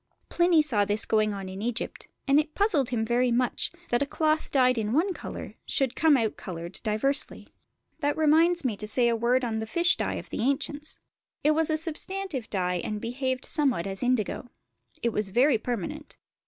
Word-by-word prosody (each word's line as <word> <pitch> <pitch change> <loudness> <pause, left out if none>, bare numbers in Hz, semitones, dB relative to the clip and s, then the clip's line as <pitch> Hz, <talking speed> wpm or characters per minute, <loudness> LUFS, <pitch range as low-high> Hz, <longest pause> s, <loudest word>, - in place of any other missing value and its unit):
Pliny 345 -2 +4
saw 230 -9 +2
this 205 +2 -1
going 215 -1 +2
on 195 -2 -5
in 190 +1 -7
Egypt, 235 +1 -3 0.2
and 275 +2 +5
it 305 0 -3
puzzled 360 - +2
him 230 -3 -1
very 245 +2 +2
much, 245 +1 0 0.2
that 240 - +2
a 285 - +1
cloth 310 +1 0
dyed 255 -3 +3
in 215 0 -2
one 360 +7 +2
colour - - -8
should 265 -2 0
come 310 -3 +4
out 225 -3 -1
coloured 170 -2 -7
diversely. 230 +6 +1 0.5
That 290 -1 0
reminds 320 +2 +3
me 235 -5 0
to 210 - -5
say 240 +2 +3
a 230 - +1
word 245 +3 +1
on 220 -2 -2
the 220 - -4
fish 345 +9 +3
dye - - -2
of - - -8
the - - -3
ancients: 285 +4 -2 0.5
it 300 - +4
was 320 +1 +1
a 310 - +1
substantive 325 - -1
dye 180 -3 0
and 210 0 -3
behaved 255 +3 -3
somewhat 275 - +1
as 195 -1 -5
indigo. 245 -1 -1 0.5
It 235 -1 +1
was 210 -2 -2
very 245 +4 +3
permanent. 250 - -5
255 Hz, 195 wpm, -27 LUFS, 220-300 Hz, 0.5 s, and